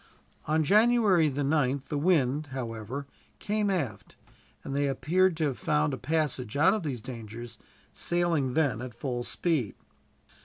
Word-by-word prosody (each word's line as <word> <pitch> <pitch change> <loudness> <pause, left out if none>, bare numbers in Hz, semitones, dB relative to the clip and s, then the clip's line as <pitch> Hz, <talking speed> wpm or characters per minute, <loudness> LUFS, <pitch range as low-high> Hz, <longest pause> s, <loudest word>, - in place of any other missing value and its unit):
On 155 +1 +2
January 210 -3 +4
the 140 +1 -2
9th 140 -2 +1
the 150 - -1
wind, 150 -3 +2
however, 125 0 -5 0.3
came 210 0 -1
aft, 145 - -3 0.5
and 135 - -4
they 145 0 +1
appeared 170 +6 +2
to 160 - 0
have 140 -4 -1
found 150 -1 +1
a - - -2
passage 135 -3 -1
out 190 +7 +5
of 215 - -1
these 135 -8 -4
dangers, 115 0 -8 0.3
sailing 170 -7 0
then 135 -8 +1
at 125 -2 -7
full 120 -1 -3
speed. 145 - -1
145 Hz, 150 wpm, -28 LUFS, 125-165 Hz, 0.5 s, out